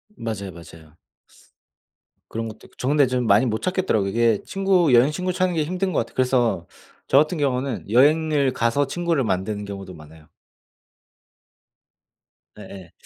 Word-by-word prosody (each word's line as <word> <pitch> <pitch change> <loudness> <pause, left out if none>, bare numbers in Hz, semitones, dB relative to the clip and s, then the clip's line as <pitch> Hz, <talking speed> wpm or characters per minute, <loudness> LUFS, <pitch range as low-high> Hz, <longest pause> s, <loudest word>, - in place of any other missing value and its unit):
맞아요, 100 - -5
맞아요. 80 -2 -15 1.3
그런 115 0 -4
것도 110 0 -10
있고. - - -29
저 125 - -4
근데 145 -2 +3
좀 125 -1 -1
많이 105 +6 +4
못 110 -1 -2
찾겠더라고요. 180 - 0
이게 115 -1 +1
친구 190 -7 +2
여행 125 +5 +5
친구 180 +4 -2
찾는 185 -1 0
게 155 - +1
힘든 185 +4 -2
것 - - +1
같아요. 115 - -4
그래서 120 -9 +1 0.4
저 135 - +3
같은 155 +3 +3
경우는 130 -5 -2
여행을 145 +3 +3
가서 120 +5 0
친구를 170 -6 -1
만드는 100 +1 -2
경우도 100 -2 -8
많아요. 75 0 -15 2.3
예예. 95 -3 -11
125 Hz, 320 characters per minute, -22 LUFS, 100-155 Hz, 2.3 s, 여행